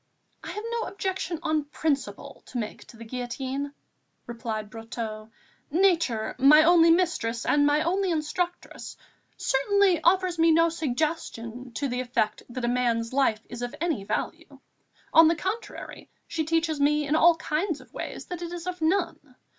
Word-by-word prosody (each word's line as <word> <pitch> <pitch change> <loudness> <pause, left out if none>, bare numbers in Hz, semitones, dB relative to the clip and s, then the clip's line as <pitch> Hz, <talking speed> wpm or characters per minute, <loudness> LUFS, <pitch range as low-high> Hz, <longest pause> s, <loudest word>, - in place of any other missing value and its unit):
"I - - -7
have 420 - -5
no 470 -1 -2
objection 380 -3 -3
on 310 -3 0
principle 290 -1 -3
to 255 - -6
make 215 -3 -5
to 230 - -14
the 230 - -9
guillotine," 255 +4 -4 0.5
replied 225 -3 -5
Brotteaux. 225 -1 -6 0.4
"Nature, 325 - +2
my 300 +4 +8
only 335 0 +6
mistress 315 -10 +1
and 290 0 +3
my 295 +1 +3
only 380 +3 0
instructress, 345 +2 -3 0.4
certainly 380 +6 +2
offers 360 0 +2
me 330 0 +5
no 330 +1 +5
suggestion 260 -6 -3
to 280 +4 -2
the 250 0 -2
effect 245 -4 -1
that 240 0 -4
a - - 0
man's 240 -1 0
life 230 -5 +1
is 240 0 -8
of 245 +3 -4
any 315 - -1
value; - - -4 0.6
on 325 0 +8
the 330 - +3
contrary, 405 +7 -6 0.2
she 320 -2 -2
teaches 320 -1 0
in 295 +1 +2
all 335 +1 +6
kinds 320 +1 -2
of - - -18
ways - - -6
that 355 -1 -6
it 340 -1 -5
is 350 -1 -6
of 360 -2 -5
none. 320 -5 -1
300 Hz, 160 wpm, -26 LUFS, 245-340 Hz, 0.6 s, my